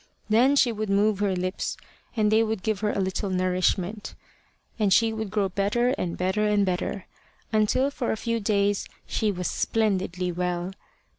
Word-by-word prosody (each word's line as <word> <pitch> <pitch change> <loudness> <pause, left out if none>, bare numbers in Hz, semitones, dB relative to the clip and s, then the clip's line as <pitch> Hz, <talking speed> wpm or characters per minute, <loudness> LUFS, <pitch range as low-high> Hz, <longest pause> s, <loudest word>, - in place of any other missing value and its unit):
Then 250 +6 +5
she 250 -3 +4
would 215 -1 -3
move 200 +1 +2
her 200 -2 +1
lips, 185 +1 -3 0.4
and 210 -1 +3
they 220 +1 +5
would 220 -3 -1
give 215 -3 0
her 210 0 0
a - - -2
little 190 +1 -1
nourishment; 185 +2 0 0.6
and 205 -3 +2
she 225 +4 +4
would 220 -2 -4
grow 200 0 +1
better 205 +6 +1
and 180 -9 -2
better 190 +4 +1
and 205 -1 +3
better, 185 +1 -2 0.5
until 220 +6 +2
for 250 -4 -2
a - - -1
few 230 +1 -1
days 200 -1 +1 0.2
she 215 -1 0
was 180 -2 -3
splendidly 185 -5 0
well. 180 +1 -2
205 Hz, 170 wpm, -26 LUFS, 185-220 Hz, 0.6 s, Then